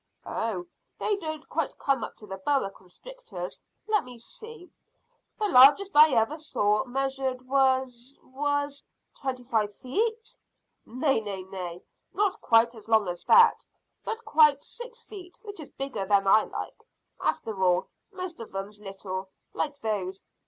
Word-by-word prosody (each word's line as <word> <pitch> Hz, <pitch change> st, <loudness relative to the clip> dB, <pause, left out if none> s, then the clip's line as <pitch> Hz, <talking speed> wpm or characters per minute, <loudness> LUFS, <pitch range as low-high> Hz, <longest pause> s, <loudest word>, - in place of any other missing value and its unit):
"Oh, 205 Hz, -6 st, -2 dB, 0.3 s
they 420 Hz, -, 0 dB
don't 315 Hz, -4 st, -6 dB
come -, -, -1 dB
quite 275 Hz, -4 st, +1 dB
up -, -, -6 dB
to 215 Hz, -, -13 dB
boa 195 Hz, +3 st, -1 dB
constrictors. -, -, -9 dB, 0.3 s
Let 430 Hz, -1 st, +2 dB
me 250 Hz, -1 st, -10 dB
see, 445 Hz, -, -11 dB, 0.7 s
the 430 Hz, -, 0 dB
largest 295 Hz, +6 st, +7 dB
I 305 Hz, +1 st, +9 dB
ever 230 Hz, +8 st, +1 dB
saw 210 Hz, -6 st, +1 dB
measured 265 Hz, 0 st, -2 dB
was 260 Hz, -1 st, +1 dB
was 285 Hz, +1 st, -2 dB, 0.2 s
" -, -, -51 dB
"Twenty 255 Hz, -2 st, -3 dB
five 215 Hz, -4 st, 0 dB
feet?" 450 Hz, -, -2 dB, 0.5 s
"Nay, 255 Hz, 0 st, +1 dB
nay, 200 Hz, -3 st, -5 dB
nay, 180 Hz, -2 st, -6 dB, 0.3 s
not 405 Hz, -1 st, +1 dB
quite 230 Hz, 0 st, +4 dB
as 225 Hz, -1 st, -14 dB
long 220 Hz, -3 st, +4 dB
as 175 Hz, 0 st, -5 dB
that, 465 Hz, 0 st, +6 dB, 0.4 s
but 450 Hz, +1 st, -5 dB
quite 300 Hz, -3 st, +5 dB
six 480 Hz, -1 st, -9 dB
feet, 370 Hz, -5 st, -11 dB
which 410 Hz, -4 st, -9 dB
is 310 Hz, -, -9 dB
bigger 255 Hz, -8 st, -4 dB
than 200 Hz, -1 st, +4 dB
I 215 Hz, +3 st, +5 dB
like, -, -, -7 dB, 0.4 s
after 210 Hz, -4 st, -2 dB
all. 180 Hz, -1 st, +3 dB, 0.3 s
Most 370 Hz, -3 st, -6 dB
of 225 Hz, -4 st, -9 dB
'em's 200 Hz, +2 st, -5 dB
little, 195 Hz, -1 st, -6 dB, 0.2 s
like 290 Hz, -2 st, -3 dB
those. 195 Hz, -4 st, -3 dB
260 Hz, 150 wpm, -27 LUFS, 210-315 Hz, 0.7 s, I